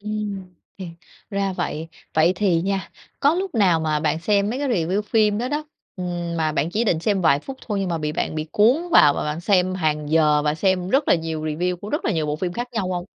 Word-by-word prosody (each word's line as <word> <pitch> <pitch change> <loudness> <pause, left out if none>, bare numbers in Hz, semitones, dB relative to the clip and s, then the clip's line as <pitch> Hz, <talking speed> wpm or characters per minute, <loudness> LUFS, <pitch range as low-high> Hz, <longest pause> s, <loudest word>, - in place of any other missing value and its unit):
Ừ, 210 - -8 0.7
thì 185 -3 -6 0.4
ra 195 -1 -1
vậy. 160 -2 -4 0.3
Vậy 160 +3 +4
thì 180 -4 +2
nha, 195 -2 -2 0.3
có 290 +3 +4
lúc 375 -4 -3
nào 185 -7 +3
mà 155 -1 0
bạn 155 +1 0
xem 200 +3 +1
mấy 250 - -3
cái 285 -1 -1
review 190 -1 0
phim 210 -1 +2
đó 245 +2 -2
đó, 300 +2 -2 0.3
ừm, 175 -2 -4
mà 155 -1 0
bạn 155 +3 -1
chỉ 220 +4 0
định 175 -6 +1
xem 200 +1 +1
vài 140 -4 +4
phút 270 - -8
thôi, 205 -3 -1
nhưng 190 - -1
mà 165 -1 -1
bị 150 0 -2
bạn - - -2
bị 155 0 -3
cuốn 225 +7 +5 0.2
vào 145 - +7
và - - -2
bạn 150 +2 -3
xem 185 -1 +2
hàng 150 -4 -1
giờ 150 -2 +4
và 150 0 +1
xem 185 +2 0
rất 275 +6 +1
là - - +6
nhiều 160 -2 -3
review 175 +4 -1
của 205 +4 -9
rất 295 - -2
là 220 - +1
nhiều 160 -3 -1
bộ 150 - -2
phim 175 +2 -3
khác 240 +3 -4
nhau 205 -6 -2
hông? 175 -1 -3
180 Hz, 250 wpm, -22 LUFS, 160-210 Hz, 0.7 s, vào